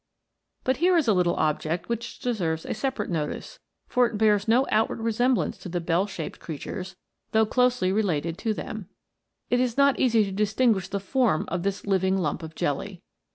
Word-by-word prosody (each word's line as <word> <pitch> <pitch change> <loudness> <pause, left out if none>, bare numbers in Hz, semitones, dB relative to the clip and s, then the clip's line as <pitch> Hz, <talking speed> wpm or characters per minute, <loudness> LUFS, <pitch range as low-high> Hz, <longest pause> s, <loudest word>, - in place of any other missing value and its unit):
But 260 -1 +1
here 355 +3 +4
is 310 -7 +2
a 220 - +5
little 180 -2 +2
object 155 +2 -1
which 235 0 -4
deserves 170 -10 -2
a - - -8
sepa 265 +3 -2
rate - - -4
notice, 160 - -4 0.3
for 250 -1 +3
it 225 - -5
bears 210 -1 +3
no 245 +4 +4
outward 220 +1 +1
resemblance 230 +3 +1
to 185 - -8
the 175 +1 -2
bell 170 +3 +1
shaped 170 -5 -6
creatures, 185 +4 -6 0.4
though 220 0 +5
closely 250 -4 +2
related 170 -6 0
to 225 - 0
them. 205 -3 -6 0.6
It 245 - +3
is 250 -1 0
not 280 -1 +4
easy 230 -4 +4
to 195 - -5
distinguish 210 0 +1
the 200 - -3
form 215 - +1
of 175 +1 -2
this 195 +1 -2
living 190 -1 +2
lump 175 -3 -1
of 160 -1 -9
jelly. 180 +6 -3
205 Hz, 190 wpm, -26 LUFS, 175-240 Hz, 0.6 s, a